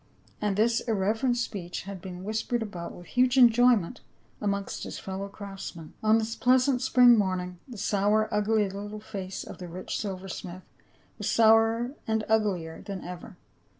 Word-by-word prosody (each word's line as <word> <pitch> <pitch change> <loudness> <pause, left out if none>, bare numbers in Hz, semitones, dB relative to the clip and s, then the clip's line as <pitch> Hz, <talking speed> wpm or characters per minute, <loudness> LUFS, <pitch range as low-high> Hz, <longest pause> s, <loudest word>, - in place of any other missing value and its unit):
And 205 -2 0
this 230 +2 +3
irreverent 225 +3 0
speech 195 -7 -4
had 195 -1 -8
been 180 0 -8
whispered 220 +3 -1
about 180 -5 -6
with 175 - -12
huge 250 +4 +2
enjoyment 245 -4 +5 0.4
amongst 200 -1 -2
his - - -6
fellow 195 +1 -5
craftsmen. 195 -5 -8
On 220 +1 +4
this 225 +1 -2
pleasant 255 0 +3
spring 250 -2 +6
morning 185 -3 -1
the 245 -4 -9
sour 210 +2 +2
ugly 210 0 +2
little 205 +2 -6
face 195 -3 -6
of - - -10
the 180 - -7
rich 180 +2 -5
silversmith 185 -2 -6 0.6
was - - -1
sourer 225 +2 +4 0.2
and 220 -1 0
uglier 195 -7 0
than 195 -2 -6
ever. 180 +2 -9
210 Hz, 150 wpm, -28 LUFS, 190-225 Hz, 0.6 s, spring